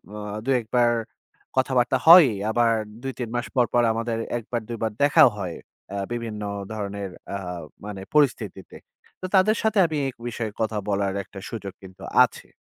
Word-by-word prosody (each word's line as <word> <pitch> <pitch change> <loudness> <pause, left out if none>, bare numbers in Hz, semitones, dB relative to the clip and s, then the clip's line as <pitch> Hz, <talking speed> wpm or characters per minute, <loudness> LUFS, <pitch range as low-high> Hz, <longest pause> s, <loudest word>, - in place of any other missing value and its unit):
অ - - -6 0.3
২-১ 130 -3 +1
বার 120 -1 +4 0.6
কথাবার্তা 130 -1 +2
হয়ই 165 -8 +9 0.2
আবার 115 +1 +3 0.3
২ 135 0 -3
৩ 120 -3 -3
মাস 120 - -1
পর, 125 - +4
পর 120 - +4
আমাদের 115 0 -2 0.2
১ 115 - -6
বার 120 -2 -1
২ 115 - -4
বার 110 - 0
দেখাও 145 -2 +7
হয় 90 -4 -4 0.4
আ - - -4 0.2
বিভিন্ন 115 -3 -4 0.3
ধরনের 100 -2 -4 0.2
অ্যা 100 - -3 0.5
মানে 100 -2 -6
পরিস্থিতিতে। 120 -10 0 0.5
তো - - -4
তাদের 215 +4 +5
সাথে 220 -1 +1
আমি 155 -2 -2
এই 135 - -1 0.2
বিষয়ে 115 -2 -4
কথা 110 -1 -1
বলার 100 -1 0
একটা 95 - -11
সুযোগ 100 -5 -6
কিন্তু 95 -1 -13 0.2
আছে। - - -12
120 Hz, 170 wpm, -24 LUFS, 105-130 Hz, 0.6 s, হয়ই